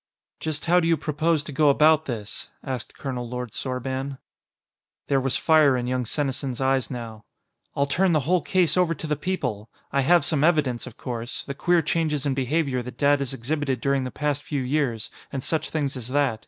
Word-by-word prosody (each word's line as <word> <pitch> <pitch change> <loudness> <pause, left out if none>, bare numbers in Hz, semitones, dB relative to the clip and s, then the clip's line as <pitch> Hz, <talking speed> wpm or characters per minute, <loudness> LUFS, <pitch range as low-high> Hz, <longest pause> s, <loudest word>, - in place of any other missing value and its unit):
"Just 155 -2 -2
how 175 +1 +5
do 165 - +1
you 165 -1 +3
propose 155 +1 0
to 150 - -8
go 145 +1 +4
about 155 +2 +5
this?" 110 -5 -5
asked 130 -4 -5
Colonel 125 -3 -4
Lord 125 -2 -4
Sorban. 130 +1 -3 0.9
There 135 -1 +3
was 135 -1 +1
fire 155 -5 +5
in 120 - -2
young 125 0 -1
Senesin's 135 -1 -2
eyes 130 -2 +1
now. 115 -4 -7 0.5
"I'll 140 - +2
turn 180 +6 +2
the 155 -3 +3
whole 175 +6 +2
case 180 -4 +2
over 180 -2 +2
to 155 - -7
the 150 -1 0
people! 125 - -3 0.2
I 140 - +2
have 170 +2 +4
some 150 -2 +1
evidence, 145 -8 +2
of 125 - -11
course; 120 -2 -4
the 140 - -5
queer 170 +4 +2
changes 150 -3 0
in 140 - +1
behavior 135 0 0
that 125 +1 -9
Dad 145 0 +4
has 140 -3 -2
exhibited 135 +1 -2
during 140 +1 +1
the 130 - -3
past 145 +2 -1
few 145 -3 -3
years, 125 -5 -1 0.2
and 135 -2 -4
such 160 -1 -1
things 145 -3 -1
as 125 -3 -5
that. 135 -4 +1
140 Hz, 200 wpm, -25 LUFS, 125-155 Hz, 0.9 s, how